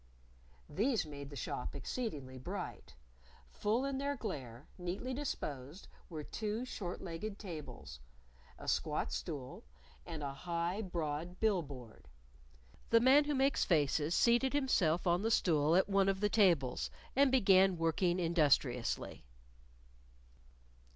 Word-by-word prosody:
These 225 +1 +1
made 140 -2 -8
the 145 - -9
shop 125 +1 -4
exceedingly 140 - -4
bright. 125 - -6 0.6
Full 225 - 0
in 275 -1 -2
their 285 +1 -1
glare, 140 - -6
neatly 185 +9 -4
disposed, 155 - -5 0.2
were 155 -3 -5
two 215 +8 -3
short 185 -8 -5
legged 190 +5 -5
tables, 155 - -8 0.6
a - - -10
squat - - 0
stool, 130 - -5 0.4
and 160 -3 -6
a 140 -1 -3
high, 170 +6 -2
broad 170 -2 -4
bill 210 -5 +3
board. 130 -7 -11 0.8
The 230 - +6
Man 265 +5 +6
Who 295 0 0
Makes 270 +1 +2
Faces 155 0 +2
seated 240 +3 +3
himself 195 - +2
on 175 +1 +3
the 225 - +1
stool 160 -7 +3
at 190 - +4
one 195 -1 +3
of 195 -1 0
the 210 +1 +2
tables 175 - +3 0.3
and 280 +1 +5
began 195 -7 +5
working 175 +2 +1
industriously. 145 -8 +1
175 Hz, 130 wpm, -35 LUFS, 145-220 Hz, 0.8 s, The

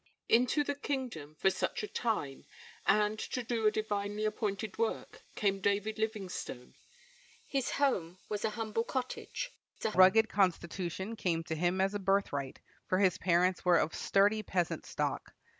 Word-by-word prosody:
Into 250 +5 +4
the 285 - -1
kingdom 255 - -4
for 190 +5 +3
such - - -2
a - - -2
time, 205 - -2 0.4
and 210 0 +3
to 250 - -3
do 230 -2 +1
a - - +5
divinely 210 -1 -2
appointed 210 -1 -2
work, 230 -1 -2
came 195 -3 +1
David 205 +3 0
Livingstone. 195 - -4 0.7
His 275 - -1
home 190 -12 0
was 210 -1 -3
a - - +2
humble 220 +1 -2
cottage. 260 - -4 0.3
A 220 - +2
rugged 200 +4 +6
constitution 190 +1 -1
came 170 -6 0
to 160 - -4
him 175 +3 0
as 195 +1 +2
a 205 - -2
birthright, 190 -9 0 0.3
for 185 - +2
his 190 -3 +3
parents 180 +1 +2
were 180 -1 +5
of 160 - +1
sturdy 205 +2 +3
peasant 180 -5 -2
stock. - - -3
205 Hz, 155 wpm, -32 LUFS, 185-220 Hz, 0.7 s, rugged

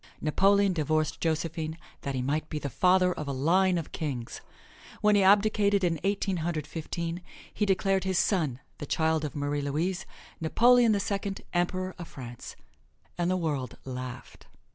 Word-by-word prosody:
Napoleon 195 +5 +3
divorced 155 -1 0
Josephine 160 0 -2 0.2
that 140 -1 -3
he 125 - -1
might 150 +4 -1
be 155 - -3
the 145 -2 -4
father 180 +2 +3
of 150 - -6
a - - -1
line 175 +7 +3
of 165 - -5
kings. 130 -7 -4 0.6
When 210 0 +4
he 205 - +5
abdicated 200 0 +4
in 165 -3 +1
Eighteen 195 -1 0
Hundred 160 -2 -2
Fifteen, 165 +2 -4 0.3
he 210 - 0
declared 195 0 +2
his 190 -2 0
son, 155 - +1 0.2
the 145 - -6
child 160 0 +1
of 150 - -4
Marie 145 0 -1
Louise, 170 +7 -2 0.3
"Napoleon 235 +8 +5
the 205 - +2
Second, 200 0 -3
Emperor 185 +1 0
of 170 - -7
France," 120 -3 -9 0.6
and 175 0 0
the 185 - +1
world 145 -7 -2
laughed. 125 -1 -7
170 Hz, 165 wpm, -28 LUFS, 150-190 Hz, 0.6 s, he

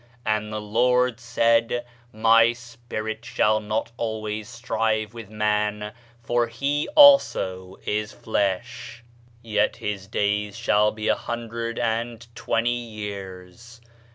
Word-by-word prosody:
"And 110 0 -1
the 110 - -3
Lord 125 +3 +2
said, 115 0 +1 0.3
My 115 +1 +5
Spirit 115 -2 -7
shall 110 -2 +2
not 110 +2 -3
always 110 -1 -4
strive 110 -3 -1
with 115 -3 -9
man, 105 0 -1 0.3
for 120 +1 +1
that 115 - -16
he 145 +3 0
also 95 - +5
is 105 0 -1
flesh: 120 +4 -3 0.4
yet 105 -2 +1
his 100 -2 -5
days 105 0 -1
shall 105 -2 +3
be 110 0 -5
a - - +5
hundred 115 0 -5
and 115 0 -2
twenty 115 0 -1
years. 105 -1 -7
110 Hz, 120 wpm, -24 LUFS, 105-120 Hz, 0.4 s, My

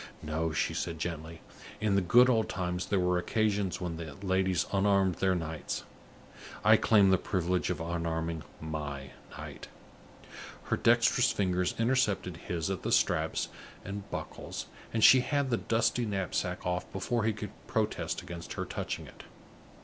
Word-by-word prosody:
"No," 80 +1 -1
she 75 - 0
said, 85 - -3
gently; 80 -1 -5 0.4
"in 105 -1 +1
the 100 - +4
good 120 +8 +6
old 115 -4 +2
times 90 -1 -2
there 100 - +1
were 90 0 +2
occasions 105 -1 0
when 85 -3 -4
the 80 -4 -7
ladies 95 -2 +2
unarmed 100 -2 +3
their 95 -1 +2
knights. 80 -2 -4 0.8
I - - +8
claim 100 -4 +5
the 95 - +4
privilege 90 -1 0
of 90 - -1
unarming 80 -1 -2 0.2
my 75 -4 -5 0.3
knight." - - -8 1.0
Her - - -1
dexterous - - +4
fingers 90 -2 0
intercepted 115 -7 +1
his 85 +1 -3
at 95 - -3
the - - -2
straps - - +2 0.4
and 100 0 -6
buckles, - - -5 0.3
and 110 -1 0
she 130 - +9
had 140 +1 0
the 120 - +3
dusty 115 +1 +1
knapsack 95 -2 -2
off, 90 0 -2
before 110 +5 -1
he 110 - +2
could 105 -1 -6 0.2
protest 110 -1 -1
against 85 -1 -7
her - - -3
touching - - -4
it. - - -13
90 Hz, 155 wpm, -30 LUFS, 85-105 Hz, 1.0 s, she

